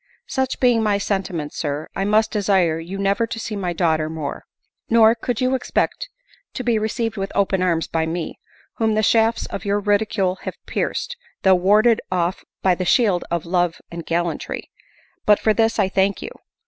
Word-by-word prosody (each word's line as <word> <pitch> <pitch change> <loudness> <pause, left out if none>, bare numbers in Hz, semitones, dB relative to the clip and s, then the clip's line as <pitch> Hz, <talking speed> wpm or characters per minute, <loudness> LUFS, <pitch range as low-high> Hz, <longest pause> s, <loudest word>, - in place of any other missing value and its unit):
Such 265 - -2
being 245 -3 +4
my 210 -2 +2
sentiments. 190 -6 -3
Sir, 145 0 -3
I 195 - -1
must 215 +2 +2
desire 190 -6 +2
you 175 +4 -6
never 200 +3 +1
to 225 - -5
see 220 -1 -4
my 185 -3 -2
daughter 160 -3 +1
more. 155 -3 -5 0.4
Nor 225 -1 +6
could 235 0 -3
you 255 +1 +2
expect - - -1 0.5
to 255 - -3
be 235 -3 +2
received 220 +1 -2
with 195 0 -3
open 195 -2 +1
arms 170 -3 +1
by 160 -1 -1
me, 165 +1 -4 0.4
whom 220 -1 +1
the 215 - +1
shafts 225 +1 +3
of - - -6
your 205 0 +1
ridicule 205 -2 +1
have - - -5
pierced, 485 - -2 0.3
though 190 - +6
warded 210 +5 +4
off 180 0 -1 0.2
by 185 - +4
the 185 - -2
shield 195 -3 +2
of 170 -1 -2
love 175 -1 +1 0.2
and 170 0 -6
gallantry; 170 0 -2 0.6
but 210 -1 +6
for 215 - +2
this 225 +1 +1
I - - +3
thank 195 +1 +1
you - - -6
200 Hz, 185 wpm, -21 LUFS, 175-220 Hz, 0.6 s, Nor